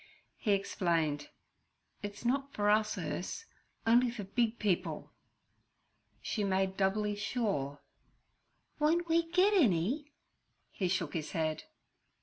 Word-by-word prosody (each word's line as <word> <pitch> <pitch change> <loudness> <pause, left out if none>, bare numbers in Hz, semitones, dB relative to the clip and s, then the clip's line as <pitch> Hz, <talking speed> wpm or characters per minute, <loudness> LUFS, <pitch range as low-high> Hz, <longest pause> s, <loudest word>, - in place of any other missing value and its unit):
He 210 - +1
explained, 165 -7 0 0.7
'It's 205 +2 -7
not 275 +3 +1
for 205 0 +3
us, 215 0 +2
Urse—on'y 245 - -1
for 230 -3 -5
big 230 +3 0
people.' 200 -5 -1 1.1
She 210 - -1
made 190 -1 +1
doubly 205 +2 +1
sure. 195 - -2 1.0
'Won't 335 +3 +2
we 330 0 +2
get 370 +4 +4
any?' 270 - +2 0.6
He 190 - -1
shook 175 -4 -1
his 155 -3 -4
head. 155 -1 -1
210 Hz, 110 wpm, -32 LUFS, 185-250 Hz, 1.1 s, get